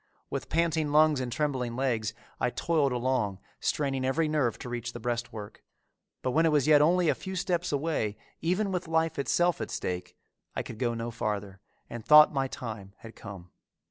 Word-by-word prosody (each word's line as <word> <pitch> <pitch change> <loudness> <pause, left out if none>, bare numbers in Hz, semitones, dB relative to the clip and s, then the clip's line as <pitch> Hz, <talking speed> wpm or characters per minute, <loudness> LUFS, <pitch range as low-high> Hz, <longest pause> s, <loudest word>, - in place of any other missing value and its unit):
With - - -4
panting 160 -3 +1
lungs 155 -1 +5
and 125 -2 -3
trembling 130 -4 -1
legs 115 -4 -1 0.2
I 125 - +2
toiled 150 0 +1
along, 120 -5 0 0.2
straining 135 -3 -1
every 150 +5 +1
nerve 150 -7 +1
to - - -8
reach 120 -1 -4
the 120 - -7
breastwork, 120 -3 -4 0.6
but 130 - 0
when 160 +5 +3
it - - +3
was 145 -3 +3
yet 150 -1 +6
only 175 +3 +4
a - - +4
few 190 0 -7
steps 180 -1 -1
away, 140 -8 -1 0.2
even 190 +4 0
with 180 -2 -2
life 160 -1 +1
itself 175 +2 +2
at 110 - -3
stake, 90 0 -4 0.4
I - - -1
could 110 - -9
go 120 -2 0
no 115 +1 -4
farther, 105 -3 -3 0.3
and 120 -1 -7
thought 150 +4 +8
my 135 -1 0
time 110 -6 -7
had 115 0 -12
come. 95 -4 -10
130 Hz, 185 wpm, -29 LUFS, 115-155 Hz, 0.6 s, thought